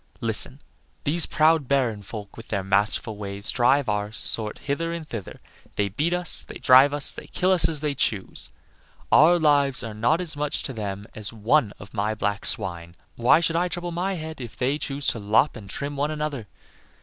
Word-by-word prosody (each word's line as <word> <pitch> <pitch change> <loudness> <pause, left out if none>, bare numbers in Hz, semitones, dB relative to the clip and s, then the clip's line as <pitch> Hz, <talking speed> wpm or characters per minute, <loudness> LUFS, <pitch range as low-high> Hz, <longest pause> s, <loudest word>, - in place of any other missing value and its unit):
Listen! - - +1 0.4
these 160 +3 0
proud 155 -3 +3
Baron 125 -6 +1
folk, 100 0 -9
with 115 - -11
their 100 -3 -2
masterful 105 +2 0
ways, 100 0 -3
drive 130 +2 +2
our 105 0 -1
sort 110 -1 0
hither 165 +4 -3
and 165 -2 -6
thither; 110 -8 -7 0.4
they 100 -1 0
beat 150 - -1
us, 175 -1 +3
they - - -8
drive 130 +2 +6
us, 145 -1 +5
they - - -10
kill 185 +1 0
us 170 -3 +3
as 155 -3 -1
they 150 -2 -1
choose. 105 -7 -2 0.6
Our 170 +4 +6
lives 145 -4 +2
are 115 -2 -6
not 120 +10 +1
as 170 -5 -1
much 145 0 -2
to 135 - -3
them 100 -3 -5
as 105 -2 -5
one 115 +2 +1
of 100 0 -13
my 105 0 -1
black 100 -1 -2
swine. 85 -1 -2 0.2
Why 120 +7 +4
should 165 -1 0
I 175 +2 +2
trouble 175 0 -5
my 185 +3 -2
head 160 -3 -7
if 110 -4 -9
they 135 +4 0
choose 140 -1 -4
to 115 - -2
lop 110 +7 +2
and 105 -5 -10
trim 140 +7 -5
one 145 +2 -1
another? 150 -7 -4
135 Hz, 195 wpm, -24 LUFS, 105-155 Hz, 0.6 s, drive